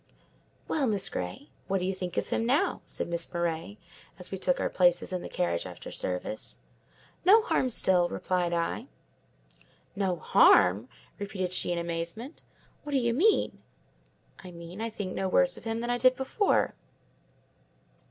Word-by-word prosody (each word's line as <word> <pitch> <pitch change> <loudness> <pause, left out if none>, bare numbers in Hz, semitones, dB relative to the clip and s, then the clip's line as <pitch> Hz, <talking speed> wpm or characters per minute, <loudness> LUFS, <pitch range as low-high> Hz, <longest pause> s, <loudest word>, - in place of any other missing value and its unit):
"Well, 285 -4 +1
Miss 205 -4 +1
Grey, 90 +11 -6 0.2
what 195 0 +1
do 180 - -2
you 190 - 0
think 180 -2 -6
of - - -1
him - - 0
now?" 260 +7 +1
said - - -3
Miss 170 0 -2
Murray, 170 +3 -2 0.4
as 180 - -8
we 190 - -4
took 180 -1 +1
our - - +1
places 180 0 +2
in 180 - -2
the - - -7
carriage 85 +1 -1
after 90 -1 -9
service. 90 +4 -4 0.7
"No 430 +4 +7
harm 265 - +1
still," 180 -6 +2
replied 180 -2 -1
I. 170 +8 -2 1.1
"No 195 -3 0
harm!" 100 - +5 0.3
repeated 195 -3 -3
she 185 - +2
in 175 - -1
amazement. 170 - -4 0.4
"What 290 - -6
do - - +4
you 235 -2 +1
mean?" 400 - +2 0.8
"I 185 - -9
mean, 170 +3 -9
I 230 - -2
think 205 -4 -5
no 190 0 -1
worse 270 +7 +3
of - - -12
him 225 0 -2
than 240 +1 -2
I 245 - 0
did 255 +1 +5
before." 265 - +1
185 Hz, 165 wpm, -29 LUFS, 170-235 Hz, 1.1 s, No